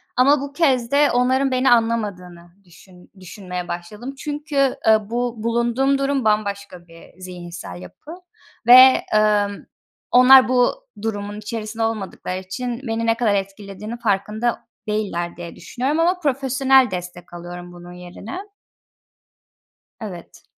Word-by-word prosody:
ama 275 +3 +4
bu 280 0 -7
kez 265 -6 +1
de 290 +1 +4
onların 260 +2 +1
beni 255 +1 +2
anlamadığını 200 -7 -1
düşün 180 +1 -19
düşünmeye 180 -1 -7
başladım 210 +11 -7
çünkü, 290 -2 -1
ııı, 215 -1 +3
bu 240 0 -2
bulunduğum 235 +4 +1
durum 275 -2 -1
bambaşka 200 -4 -2
bir 165 +1 -17
zihinsel 175 - -9
yapı 90 - -13 0.6
ve, 255 +2 +8
ımm, 210 -1 +1 0.5
onlar 255 -1 +7
bu 255 - +1
durumun 205 -1 -4
içerisinde 220 +1 -5
olmadıkları 200 -4 -4
için 240 +6 -5
beni 225 +1 -2
ne 225 0 +2
kadar 225 -4 +1
etkilediğinin 200 +3 -6
farkında 220 +1 -1 0.2
değiller 195 -6 -3
diye 170 -1 -8
düşünüyorum 270 +6 -3
ama 355 +2 +2
profesyonel 265 - +2
destek 175 -1 -7
alıyorum 175 +1 -9
bunun 175 0 -12
yerine. 180 - -9 1.6
Evet. 190 -6 -10
220 Hz, 120 wpm, -21 LUFS, 185-255 Hz, 1.6 s, ve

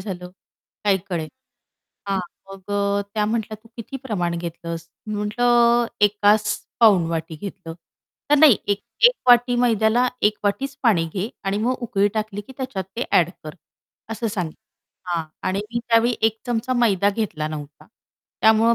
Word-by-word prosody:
झालं. 180 -3 -6 0.5
काही 200 -2 +3
कळेना. 165 -4 -3 0.8
हां, 195 - +1 0.3
मग 195 0 -11
अ, 200 0 +1
त्या 210 - +1
म्हटल्या, 220 0 -2
"तू - - -17
किती 235 +3 -6
प्रमाण 175 -8 -1
घेतलंस?" 170 -1 -6 0.2
मी 215 - -3
म्हटलं, 235 +3 +3
"एकास 205 +1 +4 0.4
पाऊण 200 -7 +6
वाटी 165 0 -3
घेतलं," 180 -1 -8 0.5
तर, 295 - +5
"नाही, 285 -7 +8
1- 205 -1 0 0.3
1 - - -1 0.2
वाटी 245 0 +6
मैद्याला, 240 0 +3
1 210 0 +4
वाटीच 265 +8 -1
पाणी 200 -9 +3
घे. 195 +2 -2 0.2
आणि 195 +1 0
मग 240 +4 +1
उकळी 205 -4 +1
टाकली 215 -2 -3
की 205 +6 -13
त्याच्यात 255 -8 -4
ते 240 - -1
ॲड 175 -1 +4
कर." 155 +1 -7 0.6
असं 225 +1 -3
सांगि 180 -7 -3 0.5
हां. 170 -2 -1 0.2
आणि 195 +2 -1
मी 235 - 0
त्यावेळी 235 +1 +4
1 220 0 +2
चमचा 245 +1 -1
मैदा 205 -5 +3
घेतला 180 -8 -3
नव्हता, 150 -1 -8 0.5
त्यामुळं 220 +1 +5
210 Hz, 155 wpm, -22 LUFS, 185-235 Hz, 0.8 s, नाही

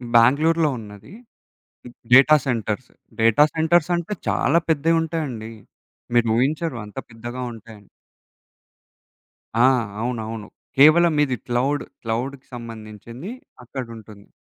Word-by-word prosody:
బెంగుళూరులో 155 +7 +4
ఉన్నది 105 - -12 1.0
data 140 +4 +8
centres. 115 -1 -2 0.3
Data 115 +6 +5
centres 160 +1 +2
అంటే 175 +5 -3
చాలా 170 - +2
పెద్దగుంటాయండి. 160 -7 0 0.6
మీరు 120 -1 +4
ఊహించరు, 145 +2 0
అంత 105 - -15
పెద్దగా 120 +2 -7
ఉంటాయని. 110 -2 -14 1.7
ఆ! - - +7 0.4
అవునవును. 115 -3 -4 0.3
కేవలం 160 +3 +6
ఇది 130 -3 -2
క్లౌడ్, 130 +4 0 0.2
క్లౌడ్‌కి 125 +4 -4
సంబంధించింది 115 - -9 0.3
అక్కడుంటుంది. 115 -5 -9
125 Hz, 90 wpm, -22 LUFS, 115-155 Hz, 1.7 s, data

